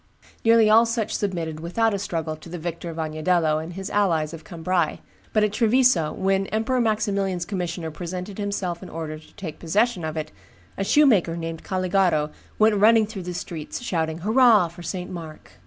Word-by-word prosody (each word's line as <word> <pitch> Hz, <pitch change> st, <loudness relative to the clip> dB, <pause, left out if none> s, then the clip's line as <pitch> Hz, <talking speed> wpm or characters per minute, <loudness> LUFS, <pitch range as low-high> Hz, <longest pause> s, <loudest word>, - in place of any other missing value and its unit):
Nearly 225 Hz, -1 st, +6 dB
all 225 Hz, +2 st, +6 dB
such 225 Hz, -2 st, -1 dB
submitted 170 Hz, -6 st, -2 dB
without 215 Hz, +7 st, 0 dB
a 200 Hz, -, -1 dB
struggle 165 Hz, -4 st, -3 dB
to 155 Hz, +2 st, -13 dB
the 175 Hz, -, -5 dB
victor 170 Hz, +1 st, -5 dB
of 165 Hz, -, -7 dB
Agnadello 155 Hz, 0 st, +1 dB
and 170 Hz, +2 st, -8 dB
his 195 Hz, +2 st, -6 dB
allies 170 Hz, -6 st, +1 dB
of 160 Hz, -1 st, -9 dB
Cambrai; 170 Hz, -1 st, -1 dB, 0.3 s
but 215 Hz, -, +3 dB
at 210 Hz, -1 st, +1 dB
Treviso, 230 Hz, -8 st, +3 dB
when 195 Hz, 0 st, 0 dB
Emperor 225 Hz, +4 st, 0 dB
Maximilian's 200 Hz, -5 st, 0 dB
commissioner 175 Hz, -4 st, -3 dB
presented 180 Hz, +5 st, -6 dB
himself 195 Hz, -4 st, -2 dB
in 185 Hz, -, -9 dB
order 155 Hz, -1 st, -5 dB
to 155 Hz, -, -19 dB
take 170 Hz, -7 st, -7 dB
possession 205 Hz, +3 st, +1 dB
of 155 Hz, 0 st, -4 dB
it, 155 Hz, 0 st, -4 dB, 0.4 s
a 195 Hz, -, -2 dB
shoemaker 200 Hz, -, +4 dB
named 165 Hz, -1 st, -5 dB
Caligaro 185 Hz, -5 st, +1 dB, 0.3 s
went 215 Hz, -1 st, +4 dB
running 220 Hz, +2 st, +5 dB
through 210 Hz, -2 st, -7 dB
the 180 Hz, 0 st, -5 dB
streets, 165 Hz, -3 st, -5 dB
shouting, 160 Hz, -7 st, -1 dB
"Hurrah! 220 Hz, -3 st, +5 dB
for 175 Hz, +1 st, -12 dB
St. 180 Hz, +2 st, -5 dB
Mark." 165 Hz, -3 st, -9 dB
180 Hz, 180 wpm, -24 LUFS, 165-210 Hz, 0.4 s, Nearly